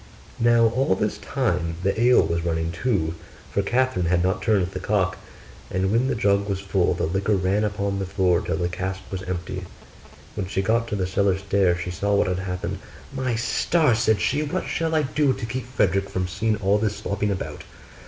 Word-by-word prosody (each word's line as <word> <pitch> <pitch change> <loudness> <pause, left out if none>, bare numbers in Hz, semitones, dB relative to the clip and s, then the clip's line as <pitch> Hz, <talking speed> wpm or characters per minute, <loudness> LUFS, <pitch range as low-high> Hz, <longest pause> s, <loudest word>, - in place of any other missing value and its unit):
Now 120 0 +5
all 115 -4 +1
this 105 +2 -2
time 90 -11 -1
the 100 +4 0
ale 125 +1 +6
was 85 0 -1
running 80 -1 -1
too, 85 -4 0 0.4
for 100 - +1
Catherine 120 -4 +1
had 85 0 +2
not 95 +1 0
turned 100 -3 +2
the 95 - -5
cock; 95 -1 0 0.5
and 95 +1 0
when 120 +4 +2
the 135 - 0
jug 100 -2 +1
was 95 -1 -1
full 95 -2 +1
the - - -1
liquor 95 +5 +1
ran 95 +3 +1
upon 100 -1 -1
the 95 - -3
floor 90 -2 +2
till 80 - -2
the 85 - 0
cask 95 +2 -4
was 95 -1 -3
empty. 90 0 -4 0.7
When 100 -3 -3
she 95 0 -1
got 115 +3 +1
to 105 - -2
the 95 -2 0
cellar 95 0 +1
stairs 95 -2 +1
she 90 - -4
saw 100 +3 0
what 100 - +3
had 90 0 -1
happened. 90 -1 -4 0.3
'My 130 -3 -1
stars!' 125 +2 +2
said 110 -3 +3
she, 145 +3 +1
'what 150 -1 -2
shall 165 -1 -1
I 155 - +3
do 145 0 +1
to - - -5
keep 125 +2 -4
Frederick 100 -5 +1
from 90 -1 -2
seeing 110 +5 0
all 105 0 +2
this 105 -1 0
slopping 100 +1 -2
about? 95 -2 -4
100 Hz, 205 wpm, -24 LUFS, 90-115 Hz, 0.7 s, ale